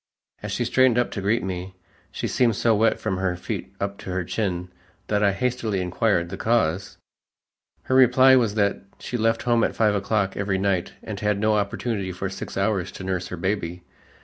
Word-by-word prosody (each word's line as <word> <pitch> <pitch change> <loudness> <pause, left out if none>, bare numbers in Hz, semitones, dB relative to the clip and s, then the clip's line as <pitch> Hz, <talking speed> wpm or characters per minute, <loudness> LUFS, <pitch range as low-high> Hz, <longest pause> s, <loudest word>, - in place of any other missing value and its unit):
As - - -5
she 120 - -1
straightened 130 0 +3
up 120 - +1
to 100 - -4
greet 110 +5 +1
me, 95 0 -5 0.4
she - - -3
seemed 120 -4 +2
so 115 +3 +2
wet 110 +2 +2
from 95 -4 -2
her 95 -1 0
feet 90 - -5
up 100 0 -3
to - - -8
her 95 0 -1
chin, 90 -2 -2 0.4
that 105 -1 +1
I 100 -1 +4
hastily 115 -2 -1
inquired 90 -1 0
the - - -6
cause. 100 -5 0 0.9
Her - - -2
reply 130 +1 +6
was 115 -5 +2
that 100 -2 +1 0.2
she - - -6
left 115 -1 +1
home 120 -1 +2
at - - 0
five 110 -2 +3
o'clock 100 -1 0
every 100 -1 -1
night 95 -2 0
and - - -6
had 105 -1 0
no 110 +1 +2
opportunity 100 -1 -1
for 95 +2 -4
six - - -7
hours 95 -2 0
to - - -8
nurse 95 -1 -2
her 90 - -6
baby. 90 -1 -2
100 Hz, 200 wpm, -24 LUFS, 95-115 Hz, 0.9 s, reply